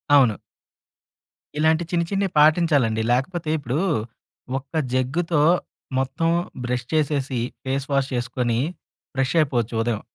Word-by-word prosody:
అవును. 125 Hz, -8 st, +5 dB, 1.2 s
ఇలాంటి 160 Hz, +2 st, +3 dB
చిన్ని 170 Hz, -1 st, +1 dB
చిన్నివి 195 Hz, -2 st, 0 dB
పాటించాలండి. 150 Hz, -8 st, +4 dB
లేకపోతే 155 Hz, +6 st, 0 dB
ఇప్పుడూ 140 Hz, +1 st, -2 dB, 0.8 s
ఒక్క 140 Hz, +4 st, -23 dB, 0.2 s
జగ్గుతో 150 Hz, +5 st, +1 dB, 0.6 s
మొత్తం 135 Hz, +5 st, 0 dB, 0.4 s
బ్రష్ 125 Hz, -1 st, -2 dB
చేసేసి 145 Hz, -4 st, 0 dB, 0.3 s
ఫేస్ 135 Hz, +1 st, -1 dB
వాష్ 140 Hz, -1 st, +1 dB
చేసుకొని 120 Hz, -1 st, -1 dB, 0.6 s
ఫ్రెష్ 135 Hz, 0 st, 0 dB
అయిపోవచ్చు 120 Hz, -6 st, 0 dB
ఉదయం. 115 Hz, -2 st, -1 dB
135 Hz, 105 wpm, -23 LUFS, 125-155 Hz, 1.2 s, అవును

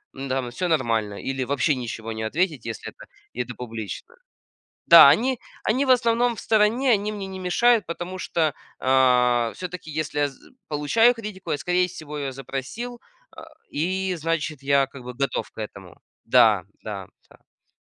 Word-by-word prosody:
м, 135 Hz, +1 st, -6 dB
там 130 Hz, -2 st, -2 dB
всё 180 Hz, +7 st, -2 dB
нормально 115 Hz, -10 st, 0 dB
или 135 Hz, -1 st, -2 dB
вообще 140 Hz, +2 st, +1 dB
ничего 115 Hz, -2 st, -5 dB
не 110 Hz, 0 st, -4 dB
ответить, 150 Hz, -, -1 dB
если 115 Hz, -2 st, -5 dB
это -, -, -14 dB, 0.3 s
и 125 Hz, -, -2 dB
это 125 Hz, +1 st, -8 dB
публично. 115 Hz, -, -7 dB, 0.7 s
Да, -, -, +11 dB
они 255 Hz, +1 st, +2 dB, 0.2 s
они 260 Hz, +6 st, +1 dB
в -, -, -3 dB
основном 240 Hz, -1 st, +3 dB
в -, -, -8 dB
стороне, 225 Hz, +4 st, +2 dB
они 210 Hz, 0 st, +1 dB
мне 200 Hz, -2 st, -5 dB
не 190 Hz, 0 st, -7 dB
мешают, 225 Hz, +5 st, +3 dB
потому 175 Hz, +2 st, -5 dB
что, 160 Hz, -4 st, 0 dB, 0.3 s
а, 125 Hz, -3 st, +3 dB
всё-таки 180 Hz, -3 st, -7 dB
если 150 Hz, -1 st, -3 dB
я 145 Hz, -, +3 dB
з 135 Hz, -, -18 dB, 0.3 s
получаю 195 Hz, +12 st, +3 dB
критику, 210 Hz, -4 st, -7 dB
я, 145 Hz, -, +1 dB
скорее 180 Hz, +4 st, +1 dB
всего, 150 Hz, -3 st, -8 dB
её 135 Hz, -1 st, -3 dB
запросил, 135 Hz, -, -6 dB, 0.3 s
э, 320 Hz, -, -10 dB, 0.3 s
и 185 Hz, +4 st, -1 dB
значит 160 Hz, -3 st, -2 dB
я, 140 Hz, -1 st, +3 dB
как 135 Hz, -1 st, -12 dB
бы, 125 Hz, 0 st, -7 dB
готов 140 Hz, +1 st, -2 dB
к -, -, -35 dB
этому. 95 Hz, -4 st, -9 dB, 0.2 s
Да, 115 Hz, -5 st, +5 dB, 0.2 s
да, 100 Hz, -3 st, -6 dB, 0.2 s
да, -, -, -19 dB
да. -, -, -47 dB
150 Hz, 175 wpm, -24 LUFS, 125-190 Hz, 0.7 s, Да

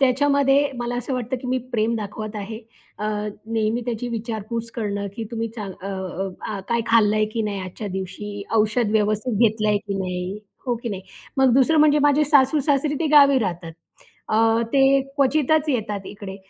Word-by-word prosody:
त्याच्यामध्ये 280 Hz, +1 st, +3 dB
मला 240 Hz, 0 st, -3 dB
असं 245 Hz, +2 st, -4 dB
वाटतं, 250 Hz, +1 st, -2 dB
की 250 Hz, -, -8 dB
मी 255 Hz, -, +1 dB
प्रेम 225 Hz, 0 st, +1 dB
दाखवत 215 Hz, 0 st, -5 dB
आहे. 210 Hz, +2 st, -5 dB, 0.4 s
अ, 210 Hz, -, -4 dB, 0.5 s
नेहमी 225 Hz, +1 st, +1 dB
त्याची 240 Hz, 0 st, -3 dB
विचारपूस 230 Hz, 0 st, -4 dB
करणं, 205 Hz, -3 st, -2 dB
की 225 Hz, -, -4 dB
"तुम्ही 230 Hz, -1 st, -2 dB
चांग 200 Hz, -3 st, -5 dB
अ 195 Hz, -, -5 dB
अ, 190 Hz, -1 st, -4 dB, 0.2 s
अ, 200 Hz, -, -4 dB
काय 235 Hz, 0 st, +1 dB
खाल्लं 215 Hz, -2 st, +4 dB
आहे 215 Hz, -, +3 dB
की 225 Hz, -, 0 dB
नाही 200 Hz, -2 st, -3 dB
आजच्या 185 Hz, +3 st, -6 dB
दिवशी? 200 Hz, +2 st, -5 dB
औषध 215 Hz, +1 st, +2 dB
व्यवस्थित 215 Hz, +1 st, +1 dB
घेतलं 215 Hz, -2 st, +2 dB
आहे 210 Hz, -, +3 dB
की 200 Hz, -1 st, -5 dB
नाही?" 180 Hz, +1 st, -3 dB, 0.3 s
हो 245 Hz, -, +1 dB
की 235 Hz, -, -3 dB
नाही. 195 Hz, -3 st, -5 dB, 0.3 s
मग 265 Hz, -2 st, +4 dB
दुसरं 275 Hz, +4 st, +4 dB
म्हणजे 300 Hz, -1 st, +5 dB
माझे 290 Hz, +1 st, +4 dB
सासू-सासरी 285 Hz, +1 st, +3 dB
ते 325 Hz, -, +1 dB
गावी 280 Hz, -2 st, +7 dB
राहतात. 175 Hz, -6 st, -3 dB, 0.6 s
अ, 225 Hz, +1 st, +3 dB
ते 275 Hz, 0 st, +5 dB, 0.2 s
क्वचितच 300 Hz, +3 st, +2 dB
येतात 210 Hz, -6 st, -2 dB
इकडे. 200 Hz, -2 st, -8 dB
225 Hz, 180 wpm, -23 LUFS, 205-265 Hz, 0.6 s, गावी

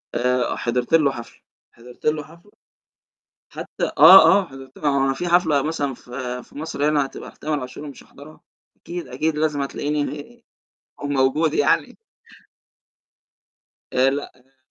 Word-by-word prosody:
آآ 125 Hz, 0 st, 0 dB
حضرت 120 Hz, +4 st, -2 dB
له 150 Hz, -4 st, +4 dB
حفلة 120 Hz, -2 st, -11 dB, 0.3 s
حضرت 120 Hz, +1 st, -16 dB
له 150 Hz, -1 st, +1 dB
حفلة، 170 Hz, +7 st, -18 dB, 1.0 s
حتى -, -, -5 dB
آه، 190 Hz, +5 st, +9 dB
آه -, -, -5 dB
حضرت 135 Hz, -2 st, -13 dB
ل -, -, -16 dB
ما 150 Hz, -, +2 dB
هو 140 Hz, -1 st, +2 dB
أنا 135 Hz, 0 st, 0 dB
في 175 Hz, +6 st, -4 dB
حفلة 160 Hz, -5 st, +3 dB
مثلًا 145 Hz, -4 st, -2 dB
في 125 Hz, 0 st, -7 dB
في -, -, -19 dB
مصر 150 Hz, -2 st, -2 dB
هنا 145 Hz, -2 st, +1 dB
هتبقى -, -, -10 dB
لتامر 150 Hz, -2 st, -4 dB
عاشور 130 Hz, +3 st, -8 dB
ومش 140 Hz, -3 st, -10 dB
هاحضرها؟ 150 Hz, +2 st, -15 dB, 0.4 s
أكيد، 175 Hz, 0 st, -8 dB
أكيد 150 Hz, +5 st, -2 dB
لازم 150 Hz, -2 st, 0 dB
هتلاقيني 145 Hz, +10 st, -4 dB, 0.6 s
موجود 145 Hz, +3 st, +1 dB
يعني. -, -, +1 dB, 2.0 s
آآ 130 Hz, +1 st, +3 dB
لأ 140 Hz, +1 st, -4 dB
أنا 130 Hz, +1 st, -30 dB
145 Hz, 145 wpm, -22 LUFS, 130-155 Hz, 2.0 s, آه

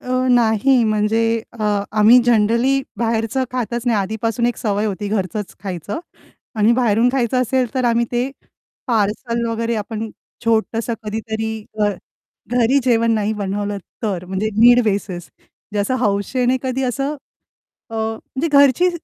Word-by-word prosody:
अ, 255 Hz, 0 st, -1 dB
नाही 240 Hz, +2 st, +4 dB
म्हणजे 215 Hz, +1 st, +1 dB, 0.3 s
अ, 225 Hz, -2 st, -5 dB, 0.3 s
आम्ही 220 Hz, +4 st, +7 dB
जनरली 235 Hz, +4 st, +3 dB, 0.2 s
बाहेरचं 225 Hz, +2 st, 0 dB
खातच 240 Hz, -1 st, -2 dB
नाही 230 Hz, -3 st, +3 dB
आधीपासून 220 Hz, +4 st, -1 dB
एक 240 Hz, -, -1 dB
सवय 210 Hz, -2 st, -1 dB
होती 205 Hz, 0 st, -3 dB
घरचंच 200 Hz, -1 st, -3 dB
खायचं 195 Hz, -, -5 dB, 0.6 s
आणि 215 Hz, +2 st, +4 dB
बाहेरून 235 Hz, -1 st, +3 dB
खायचं 255 Hz, -1 st, +1 dB
असेल 255 Hz, -1 st, 0 dB
तर 260 Hz, -1 st, 0 dB
आम्ही 235 Hz, 0 st, +2 dB
ते 245 Hz, +2 st, 0 dB, 0.6 s
पार्सल 230 Hz, +1 st, 0 dB
वगैरे 230 Hz, +1 st, -1 dB
आपण 220 Hz, +1 st, -4 dB, 0.3 s
छोटसं 230 Hz, +1 st, 0 dB
कधीतरी 220 Hz, 0 st, -4 dB, 0.2 s
अ, 205 Hz, -, +4 dB, 0.6 s
घरी 245 Hz, +3 st, +3 dB
जेवण 230 Hz, -2 st, +3 dB
नाही 215 Hz, 0 st, 0 dB
बनवलं 205 Hz, 0 st, -3 dB, 0.2 s
तर 195 Hz, -5 st, -2 dB
म्हणजे 190 Hz, +4 st, -2 dB
नीड 240 Hz, +2 st, +7 dB
बेसिस 195 Hz, -5 st, -2 dB
म्हणजे 210 Hz, -, -10 dB
असं 205 Hz, +6 st, 0 dB
हौशेने 245 Hz, +6 st, +1 dB
कधी 260 Hz, 0 st, -2 dB
असं 275 Hz, +4 st, -1 dB, 0.8 s
अ, 225 Hz, -, -7 dB
म्हणजे 225 Hz, +7 st, -3 dB
घरची 280 Hz, +6 st, +5 dB
225 Hz, 140 wpm, -19 LUFS, 210-245 Hz, 0.8 s, आम्ही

